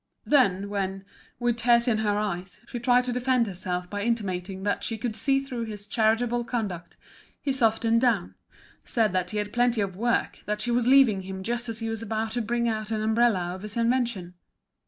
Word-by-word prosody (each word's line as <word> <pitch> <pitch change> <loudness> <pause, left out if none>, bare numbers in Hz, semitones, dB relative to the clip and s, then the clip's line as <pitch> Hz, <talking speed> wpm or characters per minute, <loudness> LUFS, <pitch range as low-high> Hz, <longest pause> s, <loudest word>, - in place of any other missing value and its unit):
Then 200 -9 +3
when, 195 -1 -3 0.3
with 240 -1 +1
tears 235 +1 +4
in 220 -3 +2
her 205 -1 +1
eyes, 190 -3 -3
she 240 - -5
tried 245 +1 +4
to 250 0 -2
defend 250 -1 +2
herself 180 -2 -4
by 205 +2 -4
intimating 195 -4 -2
that 205 0 -1
she 225 - -2
could 220 0 -3
see 270 +6 +2
through 255 -4 -4
his 210 -2 -7
charitable 225 +3 +1
conduct, 210 -8 -4 0.4
he 275 - -1
softened 230 -2 +2
down, 225 -8 +1 0.5
said 220 -5 +1
that 185 -1 0
he 215 - -4
had 210 0 -3
plenty 245 -1 +2
of 195 -3 -1
work, 235 +4 0
that 210 0 -1
she 245 - -1
was 240 0 +1
leaving 255 -7 +5
him 190 0 -7
just 235 +2 -2
as 225 - -4
he 225 - -2
was 225 -1 -4
about 220 0 -2
to 240 +2 -1
bring 235 +1 0
out 215 -2 -2
an 215 -1 -1
umbrella 220 -6 +2
of 185 - -8
his 210 +2 -7
invention. 230 -6 0
225 Hz, 200 wpm, -26 LUFS, 200-240 Hz, 0.5 s, leaving